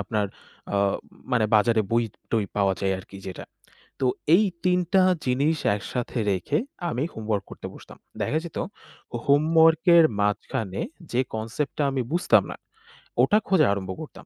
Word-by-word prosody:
আপনার, 105 +1 -1 0.5
আ - - +2 0.6
মানে 115 -3 +3
বাজারে 110 +1 +4
বই-টই 115 -1 -1
পাওয়া 100 -2 +2
যায় 95 -1 +1
আরকি 100 +1 -11
যেটা। 95 - -7 0.6
তো 130 - 0 0.3
এই 210 - +5 0.2
৩ 180 0 +3
টা 190 - +6 0.2
জিনিস 140 +5 +1 0.2
একসাথে 120 +4 -4
রেখে 95 +11 0 0.3
আমি 135 -2 -1
হোমওয়ার্ক 110 -2 -2
করতে - - -8
বসতাম। - - -13 0.2
দেখা 155 - 0
যেত 170 - -7 0.7
হোমওয়ার্ক 160 +2 +4
এর 165 - +8
মাঝখানে 100 -1 -1 0.3
যে, 120 - +1 0.2
কনসেপ্টটা 115 +7 -2
আমি 135 - -1
বুঝতাম 175 +2 +4
না, - - -6 0.7
ওটা 210 - +4
খোঁজা 190 -6 +4
আরম্ভ 95 -2 -5
করতাম। 155 - -10
120 Hz, 145 wpm, -25 LUFS, 105-155 Hz, 0.7 s, এর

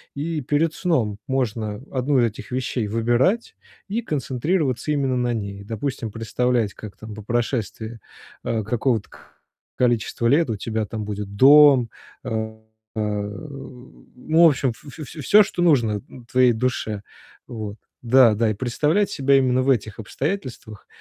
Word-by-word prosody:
И 155 +2 -3
перед 150 +4 0
сном 120 - 0
можно 110 -5 -2
1 130 +1 +1
из 120 - +4
этих 115 +2 -6
вещей 125 -3 -2
выбирать 120 - +1 0.3
и 220 +4 -2
концентрироваться 145 - -1
именно 135 -3 0
на 120 -1 0
ней. 100 -3 -5
Допустим, 115 +2 -4
представлять, 115 0 -1
как 100 -3 -10
там 110 -1 -9
по 110 - -9
прошествии, 115 -1 -2 0.4
а, 110 -1 -1
какого-то 115 0 -1 0.7
количества 120 -1 +1
лет 145 0 +3
у - - -1
тебя 110 +1 -2
там 110 +1 -5
будет 105 -1 -5
дом, 135 0 +7 0.3
а 110 -2 -4 0.4
а, - - -3
ну, 125 +8 -2
в - - +10
общем, 135 -3 0
в - - -20
в 140 - -12
в - - -5
всё, 160 +9 +4
что 175 - -2
нужно 120 -11 +3 0.3
твоей 125 -1 +5
душе. 110 -3 -2 0.5
Вот, 110 -4 -6 0.3
да-да, 115 -3 +5
и - - -1
представлять 150 - 0
себя 140 -1 +3
именно 130 -1 +2
в 135 - 0
этих 110 -5 0
обстоятельствах 130 - -5
120 Hz, 145 wpm, -22 LUFS, 110-140 Hz, 0.7 s, в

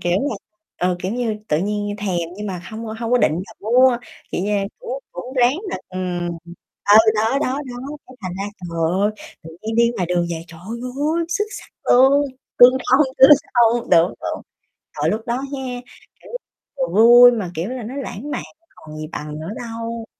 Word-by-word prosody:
kiểu 175 - 0 0.2
là, 220 - -3 0.4
ờ, 180 0 +1
kiểu 185 +3 -2
như, 235 -3 -1
tự 150 - +2
nhiên 205 +2 -2
thèm 190 -4 -1 0.2
nhưng 210 +1 -5
mà 185 -3 -5
hông 220 +1 -6
hông 225 +2 -4
có 250 - +5
định 240 - +3
là 180 +4 -6
mua, 245 +3 +4 0.4
kiểu - - -1
như, 210 - -1 0.3
cũng - - -5
cũng 260 - -8
ráng 255 +2 +3
là, - - -2
ừm 180 -2 -3 0.6
ờ, 205 - +7 0.2
đó, 225 +6 +1
đó, 265 -1 -1
đó, 245 -1 -7 0.3
cái 255 - -15
thành 185 -2 -4
ra, 195 - -2 0.2
trời 170 -2 -6 0.2
ơi, 205 - +3 0.3
tự 165 - -10
nhiên 220 +1 -3
đi 235 0 +4
ngoài 180 -4 -1
đường 175 -1 0
về, 165 -1 -4
trời 165 -1 -13
ơi! 255 - -2
Xuất 415 +4 0
sắc - - -13 0.2
luôn, 270 +3 +5 0.4
tương 245 +1 +9 0.2
thông, 270 +2 +5
tương 265 +2 +9 0.2
thông. 235 0 +3
Đúng, 170 +2 +4
đúng. - - -4 0.6
Trời, - - +2
lúc 220 - -2
đó 235 - 0
ha, 275 0 -5 0.6
kiểu, - - -14 0.5
vừa - - 0 0.2
vui 245 +1 +9
mà, 205 -7 -3
kiểu 165 +6 -3
là, 255 -1 -5
nó 240 +5 -7
lãng 280 0 -6
mạn, - - -3 0.3
còn 155 0 -11
gì 155 0 -5
bằng 150 0 -6
nữa 160 +3 -6
đâu. 230 0 -6
225 Hz, 200 wpm, -20 LUFS, 185-255 Hz, 0.6 s, tương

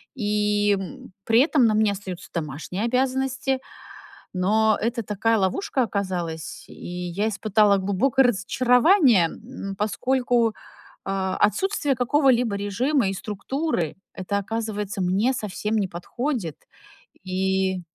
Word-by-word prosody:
И, 210 -2 +1
м, 190 0 -9
при 225 +2 +5
этом 280 -4 +3
на 215 - +2
мне 215 -1 +3
остаются 190 -3 -7
домашние 165 +6 -4
обязанности. 265 +1 0 0.7
Но 215 +4 +2
это 230 0 -1
такая 220 +3 +1
ловушка 245 - 0
оказалась, 180 -6 -4
и - - -11
я 180 +4 -3
испытала 210 -1 +3
глубокое 230 +8 +2
разочарование. 250 - +4
М, 215 -2 -8
поскольку, 235 +1 +1 0.5
э, 190 -1 -1
отсутствие 290 - +1
какого-либо 250 -4 +2
режима 220 +6 0
и - - -2
структуры- 210 - -3 0.2
это, 200 +2 -2
оказывается, 210 -2 -3
мне 195 +8 +2
совсем 210 0 -2
не 200 -3 0
подходит. 190 - -4 0.7
И 190 0 0
210 Hz, 115 wpm, -24 LUFS, 190-250 Hz, 0.7 s, при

